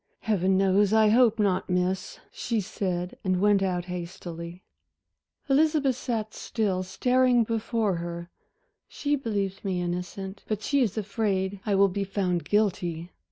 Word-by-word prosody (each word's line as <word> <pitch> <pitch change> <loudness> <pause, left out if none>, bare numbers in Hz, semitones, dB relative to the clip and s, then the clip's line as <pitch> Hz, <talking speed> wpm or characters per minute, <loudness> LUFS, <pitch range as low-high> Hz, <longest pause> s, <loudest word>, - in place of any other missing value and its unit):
"Heaven 190 -3 +2
knows 195 +1 +3
I 220 -1 +5
hope 230 0 +4
not, 195 -4 +1
Miss," 180 +1 -1
she 230 -2 -2
said 180 -2 -3
and 185 -1 +1
went 205 0 +4
out 180 -2 -1
hastily. 175 -1 -7 0.8
Elizabeth 290 -1 +3
sat 225 -4 -3
still, 200 -5 -1
staring 250 +5 +2
before 225 -3 -1
her. 170 +1 -6 0.6
"She 290 0 -1
believes 200 -7 -3
me 190 -3 -1
innocent 180 +3 -4
but 215 -1 -2
she 280 +5 +2
is 225 -4 0
afraid 200 -2 -1
I 205 - +2
will 200 +1 +5
be 200 +1 -2
found 185 -3 -1
guilty." 180 -5 0
195 Hz, 140 wpm, -27 LUFS, 180-220 Hz, 0.8 s, I